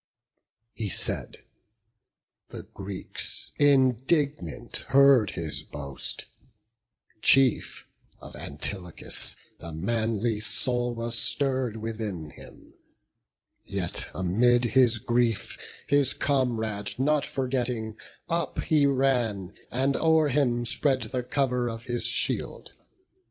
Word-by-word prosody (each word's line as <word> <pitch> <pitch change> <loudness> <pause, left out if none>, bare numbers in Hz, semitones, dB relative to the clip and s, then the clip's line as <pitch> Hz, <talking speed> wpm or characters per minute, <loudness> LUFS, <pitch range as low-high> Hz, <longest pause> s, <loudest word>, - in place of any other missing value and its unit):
He 110 -3 -4
said; - - +1 1.1
the - - -8
Greeks, 100 -1 -3
indignant, 135 - +1
heard 135 -6 +5
his 80 -3 -2
boast; 70 -2 -4 1.0
Chief, 135 -2 +3 0.3
of - - -12
Antilochus 90 -4 -1 0.2
the 85 - -8
manly 110 +5 -1
soul 120 +2 0
Was 115 0 -2
stirr'd 130 -5 +1
within 110 -8 -5
him; - - -15 0.9
yet - - -2
amid 120 +7 +2
his 125 -3 +5
grief 120 -1 0 0.3
His 140 -2 +2
comrade 115 -7 -1
not 145 +2 +1
forgetting, 125 -4 -2 0.3
up 170 0 -2
he 150 -3 +3
ran, 125 -9 0 0.2
And 135 +2 0
o'er 160 -2 +3
him 125 -4 +1
spread 130 +2 +1
the 125 - -3
cover 125 -1 -1
of 115 0 -7
his 120 -2 -2
shield. - - -2
120 Hz, 100 wpm, -26 LUFS, 110-135 Hz, 1.1 s, heard